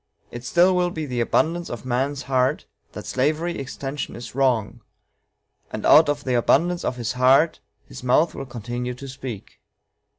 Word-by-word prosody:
It 120 0 -8
still 180 +7 +3
will 180 0 +2
be 160 -3 -4
the 125 -4 -2
abundance 170 +8 0
of 120 0 -7
man's 135 +3 -1
heart 130 +2 0 0.3
that - - -8
slavery 155 +6 -1
extension 140 +1 -5
is 120 -1 -8
wrong, 125 -5 0 0.9
and - - -5
out 155 -1 +7
of 145 -1 -1
the 130 - -1
abundance 170 +9 +2
of - - -1
his 120 -2 -3
heart 130 +6 +4 0.3
his - - -10
mouth 130 +6 +3
will 135 - -7
continue 120 +1 -5
to 135 +2 -9
speak." 130 -6 -8
135 Hz, 165 wpm, -23 LUFS, 125-155 Hz, 0.9 s, out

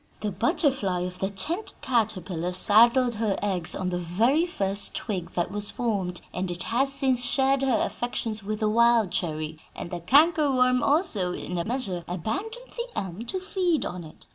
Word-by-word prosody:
The 210 - -2
butterfly 235 - 0
of 180 0 -5
the 195 - -1
tent 320 - -2
caterpillar 185 -7 -1
saddled 235 +6 +5
her 215 -3 -1
eggs 185 -5 -1
on 185 -1 -2
the 180 -1 -2
very 230 - +1
first 200 - 0
twig 185 -6 -3
that 175 +1 -1
was 205 0 -2
formed, 195 -7 -2
and 185 0 -3
it 175 +1 -3
has 270 +4 0
since 260 -3 +1
shared 270 +2 +2
her 260 -4 +2
affections 225 -2 -3
with 215 +2 -4
the 215 - +2
wild 230 -3 +3
cherry; 155 -2 -2 0.2
and - - -7
the 175 - -4
canker 295 - +4
worm 255 -1 +3
also, 275 - +3
in 180 -1 -4
a 170 - -2
measure, 215 -8 -3
abandoned 395 - -5
the 475 0 -4
elm 190 +4 -5
to 375 - -2
feed 365 -4 0
on 180 -1 -5
it. 155 - -14
215 Hz, 180 wpm, -26 LUFS, 180-265 Hz, 0.2 s, saddled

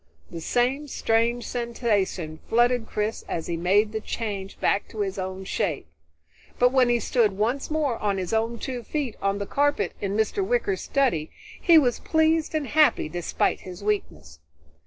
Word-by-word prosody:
The 165 - -6
same 255 - 0
strange 235 -1 +1
sensations 205 -9 -1
flooded 240 0 +3
Chris 210 +1 -2
as 165 - -3
he 170 - -2
made 200 +6 +2
the 220 0 -3
change 205 -4 -5
back 200 - +1
to 215 - -5
his 195 -1 -2
own 190 0 -4
shape, 185 - -2 0.7
but 245 0 +4
when 255 -2 +4
he 240 0 +3
stood 225 -4 +2
once 240 +6 0
more 300 -6 0
on 200 -2 0
his 185 +2 -3
own 225 +1 0
two 250 +1 -4
feet 270 0 -3
on 200 0 0
the 200 - -3
carpet 290 +6 +1
in 200 +1 -1
Mr. 220 - +1
Wicker's 420 -2 0
study, 245 - 0 0.3
he 340 -2 +6
was 250 -6 +3
pleased 320 0 +1
and 305 -2 0
happy 305 - +3
despite 175 +1 -1
his 185 +1 -10
weakness. 195 - -3
225 Hz, 170 wpm, -25 LUFS, 195-260 Hz, 0.7 s, he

